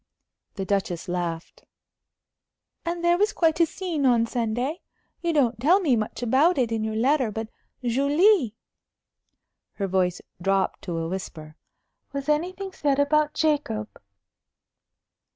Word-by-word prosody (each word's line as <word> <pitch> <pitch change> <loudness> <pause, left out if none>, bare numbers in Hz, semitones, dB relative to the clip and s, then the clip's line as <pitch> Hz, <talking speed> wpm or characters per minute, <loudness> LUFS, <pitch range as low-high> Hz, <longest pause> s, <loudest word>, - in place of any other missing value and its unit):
The 195 -2 -3
Duchess 190 -4 -1
laughed. 175 -2 -4 1.2
"And 340 0 -3
there 345 +1 +3
was 415 +1 +3
quite 325 -1 +2
a 335 - +5
scene 340 -4 -3
on 240 -3 +4
Sunday? 245 +6 -2 0.4
You 340 - 0
don't 255 -7 +2
tell 335 +10 +4
me 300 -10 +2
much 215 +2 -3
about 280 +9 +3
it 245 -3 +1
in 225 -1 -1
your 220 0 -2
letter. 255 +2 +2
But, 220 +1 -5 0.3
Julie" 280 - +3 1.2
her 200 - -3
voice 185 -2 0 0.2
dropped 195 +1 0
to 175 -3 -3
a 165 0 -2
whisper 160 -4 -6 0.6
"was 280 +1 -4
anything 365 +6 -1
said 285 -6 0
about 300 +1 +2
Jacob?" 285 -9 0
255 Hz, 135 wpm, -25 LUFS, 210-315 Hz, 1.2 s, a